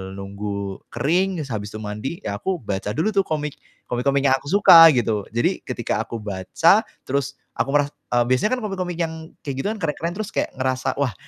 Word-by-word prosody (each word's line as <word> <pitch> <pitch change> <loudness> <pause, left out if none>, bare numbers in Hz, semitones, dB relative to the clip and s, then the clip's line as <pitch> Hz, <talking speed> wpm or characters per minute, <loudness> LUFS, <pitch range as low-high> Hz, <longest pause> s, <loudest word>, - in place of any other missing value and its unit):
nunggu 100 0 -5
kering, 180 +4 +1
se 135 - -9
habis 105 0 -5
itu - - -5
mandi, 105 - -5
ya - - -3
aku 190 -2 -1
baca 100 -2 -3
dulu 200 +8 +1
tuh 195 - +4
komik 150 -2 -2 0.3
komik-komik 135 +3 +1
yang 130 - +5
aku 140 - -14
suka, 170 -5 +9
gitu. 110 -4 0
Jadi, 120 - 0
ketika 120 -3 -2
aku 115 +1 -6
baca, 95 -3 +3 0.3
terus 140 +1 -2 0.2
aku - - 0
meras 145 0 +3 0.2
eee, 120 0 +4
biasanya 130 - +2
kan - - -6
komik-komik 185 -4 -3
yang 165 -1 -1 0.3
kayak 140 -2 -3
gitu - - -2
kan, 220 - -5
keren-keren 165 +2 -2
terus 215 0 -4
kayak - - 0
ngerasa, 130 0 -1
"Wah, 130 -7 0
135 Hz, 195 wpm, -22 LUFS, 110-170 Hz, 0.3 s, suka